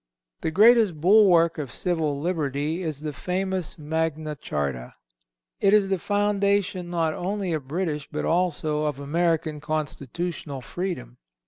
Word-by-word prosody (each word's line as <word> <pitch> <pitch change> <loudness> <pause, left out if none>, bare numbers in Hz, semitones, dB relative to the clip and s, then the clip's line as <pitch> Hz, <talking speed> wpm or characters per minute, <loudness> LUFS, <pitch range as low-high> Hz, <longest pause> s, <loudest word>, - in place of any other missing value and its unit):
The - - -1
greatest 215 -1 +5
bulwark 175 -3 +5
of 140 -5 -4
civil 160 -5 -1
liberty 155 0 -1
is 155 -5 -3
the 155 -1 -4
famous 185 +2 -2
Magna 155 0 -2
Charta. 70 - -4 0.6
It 200 0 +5
is 200 -2 +3
the 190 -2 0
foundation 200 -2 +1
not 165 -2 0
only 190 0 -2
of 150 -4 -3
British, 155 -2 -2
but 150 - -2
also 160 -3 0
of 145 -2 -2
American 160 +1 0
constitutional 155 -1 -4
freedom. 175 - -5
165 Hz, 130 wpm, -25 LUFS, 150-185 Hz, 0.6 s, greatest